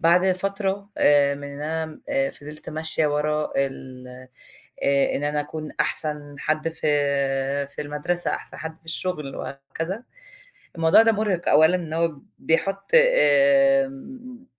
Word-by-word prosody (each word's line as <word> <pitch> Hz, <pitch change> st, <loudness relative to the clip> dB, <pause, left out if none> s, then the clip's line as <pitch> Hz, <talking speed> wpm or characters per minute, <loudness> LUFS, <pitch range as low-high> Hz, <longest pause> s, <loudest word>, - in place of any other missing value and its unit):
بعد 180 Hz, +3 st, +4 dB
فترة 195 Hz, +1 st, -3 dB
آآ، 140 Hz, -1 st, +4 dB
من 145 Hz, -, -9 dB
إن 140 Hz, 0 st, -9 dB
أنا 160 Hz, -, -2 dB
فضِلت 150 Hz, -, -11 dB
ماشية 155 Hz, 0 st, -1 dB
ورا 150 Hz, +1 st, -1 dB
ال 130 Hz, -2 st, -4 dB, 0.8 s
آآ، 140 Hz, 0 st, +2 dB
إن 145 Hz, -, -3 dB
أنا 150 Hz, 0 st, 0 dB
أكون 155 Hz, +1 st, -7 dB
أحسن 150 Hz, -2 st, -1 dB
حد 155 Hz, +2 st, -1 dB
ف 160 Hz, -, -14 dB, 1.0 s
في -, -, -4 dB
المدرسة، 150 Hz, +4 st, -2 dB
أحسن -, -, -5 dB
حد 160 Hz, 0 st, -7 dB
في 165 Hz, -, -34 dB
الشغل 160 Hz, -4 st, -2 dB
وهكذا، 165 Hz, -, -6 dB, 0.7 s
الموضوع 165 Hz, +5 st, +5 dB
ده 225 Hz, -, +4 dB
مُرهِق 205 Hz, -5 st, -1 dB
أولًا، 160 Hz, +4 st, +5 dB
إن 165 Hz, -3 st, -4 dB
هو 165 Hz, -2 st, 0 dB, 0.2 s
بيحُط 195 Hz, +4 st, -1 dB
آمم، 275 Hz, -, +3 dB
160 Hz, 130 wpm, -23 LUFS, 150-200 Hz, 1.0 s, الموضوع